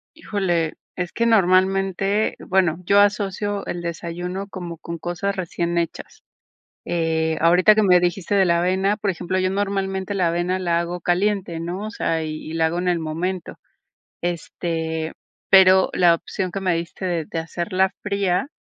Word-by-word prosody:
Híjole, 185 - -1 0.2
es 180 -1 -3
que 235 - 0
normalmente, 195 0 +2
bueno, 180 -3 +1
yo 200 +2 +5
asocio 205 0 +1
el 175 - -4
desayuno 175 +3 -5
como 175 -3 -7
con 170 +1 -7
cosas 175 +4 -3
recién 170 -1 -2
hechas. 170 -1 -4 0.6
Eh, 160 -1 0
ahorita 180 +6 +5
que 215 - +4
me 180 -2 +6
dijiste 180 +2 -1
de 195 -1 +5
la 170 -2 +3
avena, 190 +3 +1
por 205 -2 -1
ejemplo, 185 +1 -2
yo 185 0 +1
normalmente 195 -1 -2
la 185 -3 +2
avena 175 +2 0
la 170 -2 +1
hago 175 +1 -4
caliente, 180 -1 0
¿no? 180 +5 -4
O - - -5
sea, 165 -7 -1
y 155 0 -6
y - - -5
la 165 0 +2
hago 165 +2 -2
en 180 +1 -1
el 175 -1 +2
momento. 170 +3 -3 0.7
Este, 165 -2 -3 0.4
pero 190 0 +6
la 175 -2 +5
opción 185 +2 -4
que 195 - -4
me 185 -2 +1
diste 170 +3 -5
de 175 -3 -1
de 165 - -5
hacerla 185 +4 -1
fría, 200 +1 0
180 Hz, 170 wpm, -22 LUFS, 170-195 Hz, 0.7 s, me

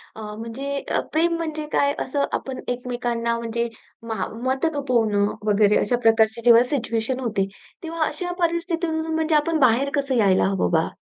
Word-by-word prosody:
अ, 220 - -8 0.2
म्हणजे 275 +5 -4 0.3
प्रेम 335 +2 +2
म्हणजे 310 -2 -4
काय 285 0 +3
असं 280 +2 0
आपण 265 -1 -7 0.2
एकमेकांना 240 -1 -2
म्हणजे 235 +1 -2 0.4
मा 205 -4 -1 0.2
मत 265 +4 0
थोपवणं 225 -7 +1
वगैरे 210 0 +4
अशा 245 +4 +1
प्रकारची 225 0 +3
जेव्हा 235 0 +7
सिच्युएशन 235 0 -1
होते, 210 -6 -1 0.4
तेव्हा 330 -1 -2
अशा 355 -1 -4
परिस्थितीतून 335 -1 0
म्हणजे 320 0 +1
आपण 310 +2 +2
बाहेर 255 +2 +3
कसं 275 -2 -1
यायला 190 -1 +4
हवं 190 - 0
बा? 160 - +1
255 Hz, 155 wpm, -23 LUFS, 225-310 Hz, 0.4 s, जेव्हा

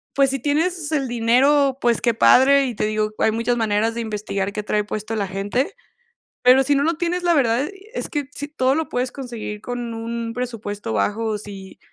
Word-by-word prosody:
pues 275 -1 +4
si 270 0 -2
tienes 315 +4 0
el 280 -4 0
dinero, 260 +4 +3
pues 235 -3 +1
qué 235 - +2
padre, 275 +4 +5
y 245 -3 -4
te 210 - -1
digo, 215 0 -1
hay 220 - +3
muchas 230 +2 0
maneras 225 0 0
de 235 - -2
investigar 205 -3 -3
qué 210 +1 -4
trae 210 0 0
puesto 215 +2 -4
la 205 -2 -1
gente. 200 +7 -2 0.7
Pero 255 +2 +6
si 285 +2 +2
no 280 - +2
lo 330 +3 +1
tienes, 350 +2 -2
la 345 -1 +4
verdad 240 -4 +2
e 395 +3 -13
es - - -4
que 290 -2 -2
sí, 290 0 -5
todo 265 -2 +1
lo 320 0 -1
puedes 250 0 -2
conseguir 235 -5 -6
con 245 -1 -5
un 230 0 -4
presupuesto 215 - -4
bajo, 215 - 0
si 195 -2 -10
240 Hz, 205 wpm, -21 LUFS, 215-280 Hz, 0.7 s, Pero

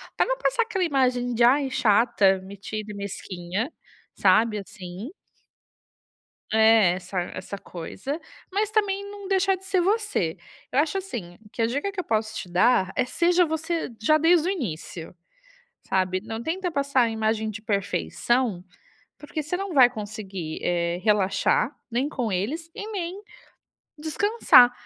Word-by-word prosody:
para - - +3
não - - -1
passar - - +1
aquela 385 -4 -2
imagem 250 -5 +1
de: 235 +1 +2
"Ai, 270 +2 +4
chata, 210 -4 +3
metida 205 +2 -7
e - - -8
mesquinha", 200 - -4 0.4
sabe, 220 -1 +4
assim. 195 - -8 1.4
É, 220 -4 +6
essa 185 0 -4
essa 190 +2 -6
coisa, 195 - -6 0.3
mas 415 +2 -1
também 400 -2 0
não 405 -2 -9
deixar 385 0 +2
de 380 - -15
ser 380 -2 +2
você. 400 - 0 0.3
Eu 270 - +2
acho 320 +5 +1
assim, 225 - -6
que 230 - -4
a - - +4
dica 285 +11 -2
que 395 - -6
eu - - -1
posso 220 0 0
te - - -5
dar 190 +1 +3
é: 255 - +2
seja 350 +6 +3
você 320 -2 -2
já 310 +7 +4
desde 330 +1 +4
o - - +2
início, 175 - -5 0.7
sabe. 185 -1 +1
Não 225 +1 -6
tenta 360 +2 -2
passar 280 -4 +2
a 230 - +1
imagem 220 0 0
de 215 +1 -7
perfeição, 215 +1 0 0.6
porque 300 +1 -5
você 355 +4 -2
não 390 -3 -4
vai 255 -3 +7
conseguir, 205 -7 -6
eh, 170 0 0
relaxar, 210 +5 +2 0.2
nem 255 +5 0
com 245 -8 -2
eles 290 - -2
e 420 - -6
nem 380 -1 -4 0.8
descansar. 315 - +5
245 Hz, 150 wpm, -25 LUFS, -, 1.4 s, vai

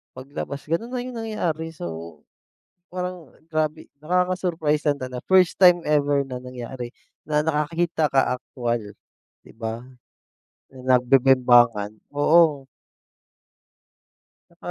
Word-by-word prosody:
pag 130 +2 -11
labas 140 -1 -5
gano'n 165 +9 -2
na 250 -1 -4
yung 250 -2 -6
nangyari. 165 -8 -3
So, 85 - -8 0.7
parang 180 -2 -5 0.2
grabe 155 -1 -2 0.2
nakaka-surprise 175 -3 0
lang 145 - +1
tala 130 -2 -6
1st 185 -1 +4
time 175 -2 +6
ever 145 -2 +2
na 125 -2 -7
nangyari 125 -1 -7 0.3
na 150 0 0
nakakita 160 +1 0
ka 135 -1 +2
aktuwal 120 -2 -3 0.6
'di - - -16
ba, 115 +1 -5 0.8
na 130 -1 +1
nagbe-bembangan, 125 -4 +4 0.2
oo. 145 -1 +3 1.8
'Tsaka - - -9
145 Hz, 110 wpm, -23 LUFS, 125-170 Hz, 1.8 s, time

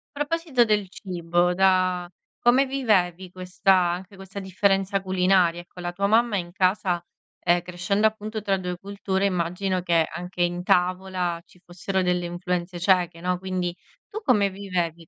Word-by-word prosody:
Proposito 295 -3 +1
del 210 -3 +1
cibo, 175 -2 -1
da 185 -2 +2 0.3
come 255 +3 +4
vivevi 190 -9 0
questa 185 +1 +1
anche 180 +2 -1
questa 195 +1 -8
differenza 195 +1 +1
culinaria? 185 -2 +2
Ecco, 175 +1 -16
la 175 0 -3
tua 200 +3 -2
mamma 225 0 +3
in 175 -1 -5
casa, 185 -2 +1 0.4
ehm, 175 0 +2
crescendo 180 +4 -1
appunto 215 0 -1
tra 195 -2 +1
2 180 -1 -4
culture, 195 0 -2
immagino 185 0 -1
che 170 -2 +2
anche 180 0 -4
in 175 0 -1
tavola, 180 -1 0
ci 180 - -23
fossero 185 +2 -2
delle 180 -1 0
influenze 175 0 -3
ceche, 175 -2 +2
no, 180 0 -1
quindi, 185 -2 -3 0.3
tu 435 - -6
come 210 - +3
vivevi 175 -4 -3
185 Hz, 150 wpm, -24 LUFS, 175-200 Hz, 0.4 s, come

